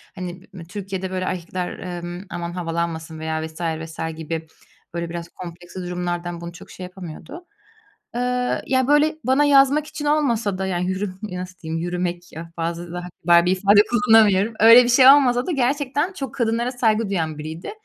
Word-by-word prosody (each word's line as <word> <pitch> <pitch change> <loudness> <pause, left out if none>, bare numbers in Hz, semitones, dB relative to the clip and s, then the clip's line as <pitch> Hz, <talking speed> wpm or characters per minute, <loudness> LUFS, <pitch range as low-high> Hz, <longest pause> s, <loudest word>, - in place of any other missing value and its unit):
hani, 180 -1 -6
ımm, 175 - -8
Türkiye'de, 190 0 -5
böyle, 185 0 -2
erkekler, 180 0 -4
ımm, 175 +2 -7
aman 175 -1 -5
havalanmasın 165 -2 -3
veya 160 0 -2
vs. 160 +1 -10
vs. 160 -1 -4
gibi, 160 0 -5 0.5
böyle, 170 -1 -3
biraz 170 0 -6
kompleksli 175 +1 -9
durumlardan 175 -1 -4
bunu 170 0 -7
çok 175 - -13
şey 185 - -9
yapamıyordu. 180 - -9 0.7
Eee, 250 0 0
ya, 260 -1 +2
böyle, 295 +2 +4
bana 265 +3 +3
yazmak 285 +1 +4
için 295 - -6
olmasa 235 -10 +1
da, 190 - -2
yani, 180 -1 -1
yürü 190 0 -2
nasıl 185 -3 -6
diyeyim, 160 0 -4
yürümek, 175 0 -2
ah, 165 0 -8
fazla 170 +1 -4
daha 180 0 -5
kibar 170 0 +5
bir 180 - +2
ifade 200 +2 +5
kullanamıyorum, 225 -3 +4
öyle 230 +3 +9
bir 240 - -1
şey 255 +1 +7
olmasa 260 -3 +6
da - - -2
gerçekten 285 +4 0
çok 270 -9 -6
kadınlara 235 -1 0
saygı 225 -4 +1
duyan 160 -5 -2
biriydi 160 +3 -6
185 Hz, 170 wpm, -22 LUFS, 170-240 Hz, 0.7 s, öyle